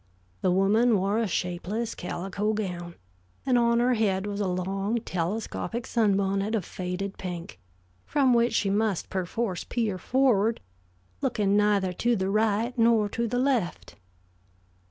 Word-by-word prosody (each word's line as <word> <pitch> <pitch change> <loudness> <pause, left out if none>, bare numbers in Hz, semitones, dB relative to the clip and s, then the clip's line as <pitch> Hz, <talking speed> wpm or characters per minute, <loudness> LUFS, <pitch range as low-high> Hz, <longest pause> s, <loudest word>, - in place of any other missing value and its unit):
The - - +2
woman 205 +5 +3
wore 200 +3 +1
a 230 - +1
shapeless 190 +6 -2
calico 195 +4 -3
gown, 175 -5 -4 0.5
and 255 - +2
on 235 -1 +3
her 250 +1 +3
head 200 -4 +1
was 205 0 -4
a 200 - 0
long, 195 +5 -1
telescopic 215 +5 -3
sunbonnet 200 -1 +1
of 200 -6 -2
faded 185 +2 -5
pink, 175 - -6 0.5
from 275 -4 +3
which 235 0 +3
she 200 -3 +1
must 205 -2 0
perforce 190 +1 -2
peer 215 -6 -2
forward, 235 -4 +2 0.6
looking 200 -1 +1
neither 205 -3 +2
to 240 +6 +1
the 190 -1 -1
right 220 +3 +1
nor 225 -2 +4
to 235 +3 -2
the 245 +2 -2
left. 250 -8 -1
205 Hz, 140 wpm, -27 LUFS, 190-230 Hz, 0.6 s, nor